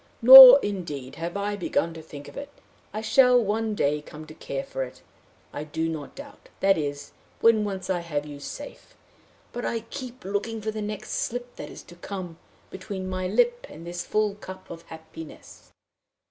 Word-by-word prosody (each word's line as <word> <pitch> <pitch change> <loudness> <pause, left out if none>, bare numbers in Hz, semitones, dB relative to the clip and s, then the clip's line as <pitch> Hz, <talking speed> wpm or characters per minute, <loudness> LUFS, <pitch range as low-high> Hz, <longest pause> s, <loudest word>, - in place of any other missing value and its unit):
Nor, 260 +2 +12
indeed, 165 -10 -5
have 170 +3 -5
I 205 +1 -2
begun 170 -3 -2
to 160 - -10
think 145 -2 -11
of - - -13
it. 285 0 -7 0.4
I 215 - -5
shall, 250 +3 +4
one 220 0 -1
day, 150 -4 0
come 155 +1 -12
to 155 - -12
care 140 -3 -6
for - - -6
it, 125 - -11 0.5
I 145 - -5
do 160 +2 -3
not 155 -3 -6
doubt 285 0 -13
that 195 0 +3
is, 145 -2 -5 0.3
when 225 -2 +4
once 190 -3 -5
I 185 -2 -1
have 150 -4 -4
you 145 -1 -10
safe; 145 - -10 0.6
but 240 - -5
I 230 - -2
keep 255 -2 -8
looking 205 +3 -3
for 215 +1 -4
the 215 0 -6
next 210 0 -6
slip 245 +1 -4
that - - -8
is - - -11
to 175 - -15
come 175 -2 -8 0.3
between 190 0 -7
my 185 0 -3
lip 485 - +1
and 165 - -12
this 175 0 -5
full 215 -1 0
cup 190 -2 -11
of 165 -1 -9
hap 160 0 -13
piness. 160 -2 -12
190 Hz, 190 wpm, -25 LUFS, 160-220 Hz, 0.6 s, Nor